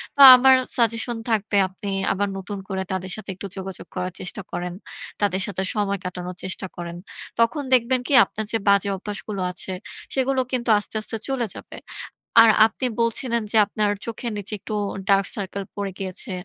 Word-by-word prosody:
তো - - -14 0.2
আমার 260 +1 +6 0.2
সাজেশন 230 0 +1
থাকবে, 210 -1 0
আপনি 190 +2 -8 0.2
আবার 200 +1 0
নতুন 200 +2 -6
করে 190 -1 -2
তাদের 185 0 -3
সাথে 215 -2 -10
একটু 200 - -7
যোগাযোগ 190 -2 -7
করার 180 -1 -3
চেষ্টা 190 +2 -5
করেন। 175 0 -4 0.5
তাদের 195 -2 +1
সাথে 190 -2 -3
সময় 200 -2 0
কাটানোর 180 0 -5
চেষ্টা 185 0 -4
করেন। 170 0 -6 0.4
তখন 230 +6 +2
দেখবেন 255 +1 +4
কি? - - -1
আপনার 220 - -5
যে 225 - +2
বাজে 200 0 +4
অভ্যাসগুলো 200 0 -5
আছে, 185 +1 -4 0.4
সেগুলো 265 0 +1
কিন্তু 245 -2 -1
আস্তে, 205 - -8
আস্তে 225 +1 -4
চলে 260 -3 0
যাবে। - - -10 0.7
আর 230 - +7 0.2
আপনি 250 +3 -3
বলছিলেন 230 0 0
যে 225 - +1
আপনার 210 0 0 0.2
চোখের 230 +1 -4
নিচে 205 +1 -6
একটু 215 +1 -6 0.4
dark 195 -1 +4
circle 200 0 -4
পড়ে 200 -1 -2
গিয়েছে 195 +4 -5
205 Hz, 170 wpm, -23 LUFS, 190-230 Hz, 0.7 s, আর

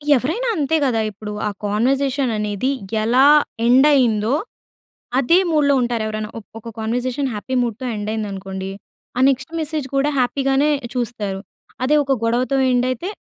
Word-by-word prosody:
ఎవరైనా 330 - -1
అంతే 310 0 0
గదా! 245 -5 +1
ఇప్పుడు 210 +1 -8 0.2
ఆ - - 0
కన్వర్జేషన్ 260 +6 +1
అనేది 210 +4 -1 0.3
ఎలా 245 +4 +4 0.4
ఎండ్ 260 +5 +6
అయిందో, 230 -4 +2 0.9
అదే 335 +7 +4
మూడ్‌లో 295 -3 +3
ఉంటారు 240 -2 -1
ఎవరైనా. 215 0 -4
ఒక్ 210 - -18
ఒక 230 +1 -9
కన్వర్జేషన్ 245 +4 -1
హ్యాపీ 235 +5 -4
మూడ్‍తో 240 +2 -4
ఎండ్ 210 0 -4
అయిందనుకోండి. 195 -3 -5 0.5
ఆ - - +2
నెక్స్ట్ 265 +2 -2
మెసేజ్ 305 -3 -3
కూడా 280 +2 +2
హ్యాపీగానే 270 +3 +2 0.2
చూస్తారు. 215 -5 -3 0.4
అదే 285 +4 +3
ఒక 275 -1 +1
గొడవతో 245 +4 +1
ఎండ్ 250 0 +2
అయితే, 255 +10 -4
250 Hz, 145 wpm, -20 LUFS, 215-275 Hz, 0.9 s, ఎండ్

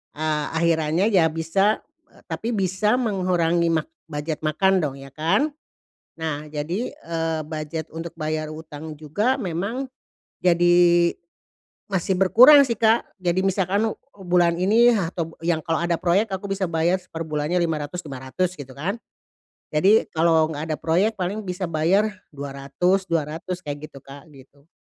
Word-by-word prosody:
Ah, 155 -1 -1
akhirannya 165 +4 +2
ya 180 -5 +5
bisa, 165 +6 0 0.2
eee, - - -23
tapi 230 +1 -2
bisa 195 +3 +1
mengurangi 180 -7 +1
mak 165 - 0 0.2
budget 150 0 -4
makan 185 +5 +2
dong 145 -5 -2
ya 135 0 -11
kan. 170 - +1 0.7
Nah, 155 -2 -3
jadi 160 +10 -3
eee, 165 -1 -3
budget 155 0 -5
untuk 165 +1 -6
bayar 155 -1 -2
hutang 155 0 -8
juga 185 - 0
memang, 220 +6 -3 0.5
jadi, 175 -1 +4 0.7
masih 190 -1 -1
berkurang 260 +9 +8
sih 235 - -1
Kak. 225 +1 +2
Jadi, 180 -2 0
misalkan 195 +3 +1
u - - -3 0.3
bulan 175 -1 +3
ini 225 +6 +5
atau 170 -6 -2
yang 165 -1 -1
kalau 160 0 0
ada 170 0 +1
proyek, 180 +6 +1
aku 195 +1 -6
bisa 195 -2 -1
bayar 170 +3 +1
perbulannya 155 0 -2
lima 160 -2 -1
ratus 180 +4 -7
lima 135 -4 -7
ratus 180 +5 -2
gitu 130 -2 -9
kan. 195 +11 -3 0.7
Jadi, 195 +9 +4
kalau 160 -1 +3
enggak 155 +2 -5
ada 155 - -1
proyek, 185 +9 +1
paling 190 +3 -2
bisa 180 +1 -3
bayar 180 +6 +1 0.2
dua 140 -1 -6
ratus 180 +8 0
dua 165 -3 +1
ratus 175 +4 -6
kayak 145 +1 -6
gitu 140 - -13
Kak, 140 +2 -12
gitu. 140 +3 -19
170 Hz, 155 wpm, -23 LUFS, 155-190 Hz, 0.7 s, berkurang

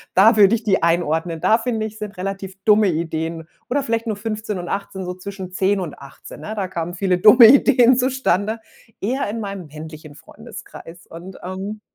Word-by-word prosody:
da 220 +4 +6
würde 205 +1 +6
ich 230 - -5
die 200 -3 +1
einordnen. 165 -1 0
Da 220 - +4
finde 225 -2 -2
ich, 215 0 -8
sind 210 0 -7
relativ 195 0 -5
dumme 210 -1 +4
Ideen 160 -1 -3 0.2
oder 280 +2 0
vielleicht 230 -2 -2
nur 220 - -1
15 215 0 -4
und 175 -1 -6
18, 195 -1 -4
so 180 - -4
zwischen 190 0 -8
10 195 +1 +1
und 170 -5 -7
18, 140 +1 -13
ne? 210 +8 -6
Da 200 -3 -2
kamen 170 -1 -4
viele 185 0 0
dumme 225 +4 +8
Ideen 255 -1 +5
zustande, 230 -5 0 0.4
eher 255 +3 -1
in 225 +2 -4
meinem 195 -4 -6
männlichen 155 0 -11
Freundeskreis 165 +3 -12
und, 175 +3 -11
ähm 195 +4 -6
195 Hz, 185 wpm, -20 LUFS, 175-220 Hz, 0.4 s, dumme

